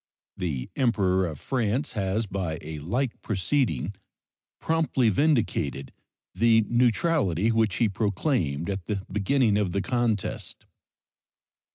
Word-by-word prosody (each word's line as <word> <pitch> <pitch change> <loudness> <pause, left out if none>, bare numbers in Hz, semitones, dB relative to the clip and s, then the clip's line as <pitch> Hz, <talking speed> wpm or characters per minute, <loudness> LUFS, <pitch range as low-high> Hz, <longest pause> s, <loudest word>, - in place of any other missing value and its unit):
The 75 -8 -3
Emperor 95 -8 +2
of 75 -4 -7
France 125 - -1
has 100 +2 -1
by 95 -5 -3
a 80 0 -6
like 120 - -2
proceeding 100 - 0 0.7
promptly 160 -7 +1
vindicated 95 - 0 0.4
the 115 +3 +4
neutrality 120 - +2
which 110 -4 +2
he 115 - +3
proclaimed 100 - -1
at 100 -2 -3
the 100 -3 -3
beginning 105 +2 +2
of 100 -4 0
the 100 - 0
contest. 120 -5 -2
105 Hz, 110 wpm, -26 LUFS, 90-120 Hz, 0.7 s, the